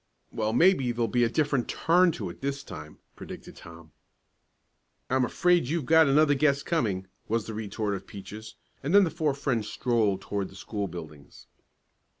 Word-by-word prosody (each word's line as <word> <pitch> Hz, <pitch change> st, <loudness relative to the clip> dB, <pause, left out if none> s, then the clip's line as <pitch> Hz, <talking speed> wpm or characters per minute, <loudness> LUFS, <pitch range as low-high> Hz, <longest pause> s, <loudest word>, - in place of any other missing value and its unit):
"Well, 110 Hz, -1 st, -1 dB
maybe 135 Hz, -1 st, +4 dB
there'll 120 Hz, -1 st, 0 dB
be 120 Hz, +3 st, +2 dB
a 115 Hz, -, +2 dB
different 140 Hz, -2 st, 0 dB
turn 175 Hz, +2 st, +3 dB
to 95 Hz, -9 st, -5 dB
it -, -, -16 dB
this 140 Hz, 0 st, -3 dB
time," 75 Hz, -, -10 dB, 0.2 s
predicted -, -, -10 dB
Tom. 85 Hz, -1 st, -13 dB, 1.2 s
"I'm 130 Hz, 0 st, +3 dB
afraid 175 Hz, +5 st, +2 dB
you've 160 Hz, -1 st, -1 dB
got 160 Hz, 0 st, +6 dB
another 145 Hz, +1 st, +4 dB
guess 140 Hz, 0 st, +2 dB
coming," 105 Hz, -, -1 dB, 0.2 s
was 115 Hz, 0 st, 0 dB
the 110 Hz, -, -6 dB
retort 105 Hz, -1 st, -3 dB
of 95 Hz, -1 st, -6 dB
Peaches; 105 Hz, +2 st, -9 dB, 0.3 s
and 150 Hz, +8 st, 0 dB
then 205 Hz, -, +8 dB
the 170 Hz, -, 0 dB
four 155 Hz, -4 st, 0 dB
friends 120 Hz, -6 st, -1 dB
strolled 110 Hz, -7 st, 0 dB
toward 100 Hz, -2 st, -3 dB
the -, -, -15 dB
school 105 Hz, -2 st, -4 dB
buildings. 75 Hz, -5 st, -11 dB
120 Hz, 170 wpm, -27 LUFS, 100-150 Hz, 1.2 s, then